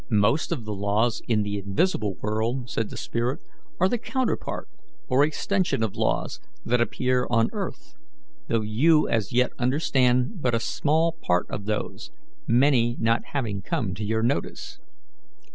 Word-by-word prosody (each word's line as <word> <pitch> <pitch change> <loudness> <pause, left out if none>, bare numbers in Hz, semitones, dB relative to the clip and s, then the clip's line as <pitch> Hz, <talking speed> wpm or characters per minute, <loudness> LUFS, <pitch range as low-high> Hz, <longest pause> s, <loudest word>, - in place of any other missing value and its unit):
"Most 110 +10 +2
of 135 -10 -2
the 105 - -3
laws 105 +4 0
in 110 -3 +2
the 105 0 -2
invisible 100 - 0
world," 115 +4 -2
said 115 -2 -1
the - - -8
spirit, 120 +6 -2 0.4
"are 185 - +5
the 240 +4 -1
counterpart 260 +1 -2 0.4
or 130 +3 +4
extension 175 - 0
of 110 - -2
laws - - -1 0.3
that 120 +1 +2
appear 125 +1 +1
on 115 -1 +2
earth, - - -5 0.5
though 115 - +1
you 150 +9 +3
as 110 -4 0
yet 125 +1 +2
understand 130 - +2
but 125 -3 +1
a - - +1
small 160 +7 +1
part 90 0 +1
of 100 - -4
those, 105 0 -3 0.4
many 120 -1 +3
not 115 +1 +1
having 110 -8 -2
come 95 0 -2
to 100 +4 -5
your 110 +2 0
notice. 125 +5 -2
120 Hz, 155 wpm, -25 LUFS, 110-135 Hz, 0.5 s, are